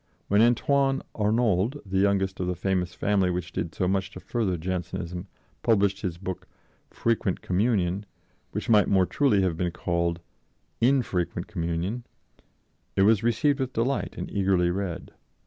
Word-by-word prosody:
When 100 +2 +4
Antoine 135 +3 +3
Arnauld, 110 +3 +1
the 95 -1 0
youngest 95 -1 +1
of 90 - -1
the 90 - -1
famous 90 0 -1
family 100 -3 +2
which 90 -1 -3
did 85 -1 -4
so 90 - 0
much 95 0 0
to 100 - -10
further 105 -7 -1
Jansenism, 90 +1 -4 0.3
published 100 -3 +2
his 90 -4 -3
book 95 0 -6 0.4
Frequent 115 -5 -1
Communion, 100 -1 +1 0.4
which - - -4
might 105 -3 +5
more 95 -2 +4
truly 105 -4 +2
have 85 -4 0
been 90 0 0
called 85 0 -1 0.6
"_In_frequent 120 -9 +1
Communion," 85 +8 -3 0.9
it 95 - +4
was 110 0 +5
received 125 +5 +2
with 130 -1 -2
delight 120 +4 -1
and - - -5
eagerly 95 -3 +2
read. 95 -2 -4
95 Hz, 145 wpm, -26 LUFS, 90-115 Hz, 0.9 s, might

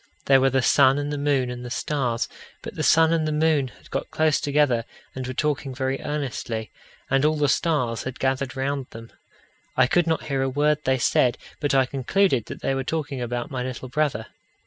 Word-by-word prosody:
There 135 -1 +5
were 135 - +4
the 130 -1 +1
sun 135 0 +5
and 145 0 -2
the - - -2
moon 140 -3 +1
and 125 0 -7
the 125 - -6
stars. 120 -2 -1 0.4
But - - -7
the - - -4
sun 160 0 +5
and 160 -2 +1
the - - 0
moon 150 -3 +2
had - - -18
got - - -3
close 155 -1 +1
together 145 -5 +2 0.3
and 130 -1 -5
were 130 - -5
talking 145 -3 -1
very 130 +1 -2
earnestly, 125 -6 -4 0.4
and 135 0 +3
all 155 +1 +2
the 145 -1 +2
stars 130 -7 +1
had 130 0 -6
gathered 135 0 -1
round 135 0 -2
them. 115 0 -11 0.7
I 130 - +6
could 170 +6 +2
not 160 -1 0
hear 140 -3 -1
a 135 - +1
word 150 +2 +1
they 130 0 +2
said, 125 0 +2 0.2
but 145 -3 0
I 135 -1 +5
concluded 135 - +1
that - - -8
they 135 - +1
were 135 0 -1
talking 145 -3 -3
about 120 +1 -3
my 130 -2 -3
little 130 0 -5
brother. 145 -5 0
135 Hz, 215 wpm, -24 LUFS, 125-150 Hz, 0.7 s, I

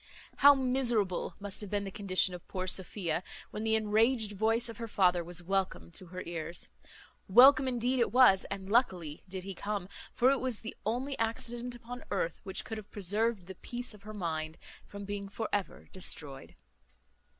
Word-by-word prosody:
How 285 +1 +8
miserable 245 -8 0
must 200 0 -4
have 205 - -6
been 205 0 -1
the 195 - -5
condition 185 -2 +3
of 180 - -9
poor 185 -1 -3
Sophia, 185 -1 0 0.3
when 215 - -4
the 220 0 +2
enraged 220 +1 +2
voice 225 +4 +1
of 230 - -7
her 230 -1 -5
father 180 -4 +3
was 175 +1 -1
welcome 185 - -1
to 185 - -6
her 185 +1 -7
ears! 170 0 -3 0.6
Welcome 265 +6 +8
indeed 250 +1 0
it 235 - +2
was, 245 -6 +6
and 195 -1 -5
luckily 185 - +1
did 185 -1 -5
he 195 +1 -6
come; 200 0 -3 0.2
for 255 +2 +4
it 275 - +1
was 255 -4 -1
the 225 - -7
only 260 +5 -1
accident 235 +2 -2
upon 245 +1 -9
earth 170 -5 -2
which 190 -2 -2
could 220 -1 -5
have 210 - -13
preserved 205 +1 0
the 190 - -8
peace 240 +6 -5
of 210 - -15
her 215 +1 -9
mind 160 -4 -3 0.3
from 200 0 -8
being 200 0 -5
for 220 +2 -4
ever 205 -2 -2
destroyed. 145 -7 -4
205 Hz, 185 wpm, -31 LUFS, 185-235 Hz, 0.6 s, How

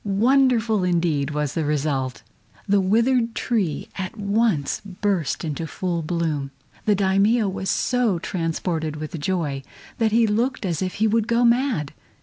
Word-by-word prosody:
Wonderful, 230 0 +3
indeed, 165 -5 +1
was 150 -1 -2
the 165 - -1
result! 140 -4 -1 0.4
The 200 0 +3
withered 230 +4 +2
tree 200 -11 -1
at 190 +3 -4
once 200 -7 0
burst 195 -5 -1
into 160 +1 -3
full 175 +1 -2
bloom! 155 -4 -2 0.4
The 210 - +4
Daimio 200 +3 +3
was 190 0 -3
so 245 -7 +1
transported 165 -2 -2
with 155 +2 -6
joy 150 -4 -1 0.4
that 225 -1 +2
he 230 +1 +4
looked 230 +3 0
as 170 -4 -1
if 185 -1 -2
he 215 - +1
would 220 0 +2
go 235 +1 +3
mad. 235 - +1
190 Hz, 145 wpm, -23 LUFS, 160-225 Hz, 0.4 s, The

